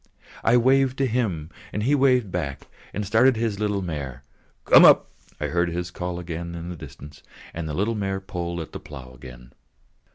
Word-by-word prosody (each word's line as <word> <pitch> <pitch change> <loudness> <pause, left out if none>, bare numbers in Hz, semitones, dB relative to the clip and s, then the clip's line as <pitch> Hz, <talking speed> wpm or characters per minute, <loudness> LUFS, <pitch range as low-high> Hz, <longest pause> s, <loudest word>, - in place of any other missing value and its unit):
I 120 +2 +5
waved 130 +2 +3
to 135 - +2
him; 105 -11 -1 0.3
he 125 +7 +1
waved 130 -7 +3
back 75 -6 -3
to - - -18
me - - -33 0.2
and 105 +1 -2
started 115 +6 +4
his 110 -3 -2
little 105 -2 -1
mare. 70 -6 -5 0.4
"Come - - +8
up!" - - +6 0.3
I - - -2
heard 85 0 0
his 85 +1 -4
call 90 -1 -4
in 85 0 -6
the 90 - -5
distance 70 -1 -11
again, - - -27 0.3
and 80 -1 -4
the 75 - -3
little 105 +6 0
mare 95 -3 -2
pulled 85 -3 -4
at 80 - -8
the - - -7
plough 65 -4 -11
again. 60 -1 -13
90 Hz, 195 wpm, -24 LUFS, 80-110 Hz, 0.4 s, Come